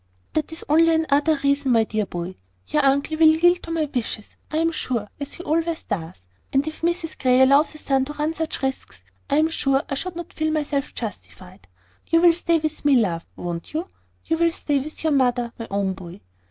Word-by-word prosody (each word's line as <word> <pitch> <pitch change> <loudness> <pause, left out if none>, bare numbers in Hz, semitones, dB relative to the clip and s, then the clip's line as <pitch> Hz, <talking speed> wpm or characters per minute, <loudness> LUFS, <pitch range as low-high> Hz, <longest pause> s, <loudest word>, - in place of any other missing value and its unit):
"That 310 0 -1
is 320 - -5
only 325 +2 +5
another 315 0 +2
reason, 280 -2 +2
my 225 -1 +5
dear 215 -2 -2
boy. 175 +1 -5 0.3
Your 300 -1 +1
uncle 280 +3 +2
will 320 0 +7
yield 350 +2 +4
to - - -10
my 325 -2 0
wishes, 225 -3 -4
I 310 - -2
am 330 +1 +2
sure, 240 -9 -2
as 285 - -5
he 350 - -8
always 330 +1 -1
does. 165 - -5 0.3
And 275 +2 +1
if 310 - -6
Mrs 335 -1 -1
Grey 255 -1 +4
allows 275 +4 +5
her - - -11
son 270 -3 +1
to 295 - -6
run 300 +2 -1
such 320 -3 -4
risks, 180 - -4 0.3
I - - +2
am 315 +1 +3
sure 275 -3 +1
I - - +1
should 360 +6 -4
not 345 -1 -7
feel 315 0 -1
myself 290 -3 -2
justified. 190 -3 -8 0.4
You 330 0 +3
will 345 -1 +7
stay 335 0 +3
with 310 -1 -3
me, 290 -2 +5
love, 180 -9 +1
won't 170 - -6
you? 330 +5 -3 0.4
You 325 0 0
will 335 0 +4
stay 290 -3 0
with 305 +4 -7
your 315 -2 +2
mother, 245 -3 +1
my 230 - -5
own 195 -1 0
boy." 180 -2 -10
285 Hz, 215 wpm, -23 LUFS, 240-320 Hz, 0.4 s, will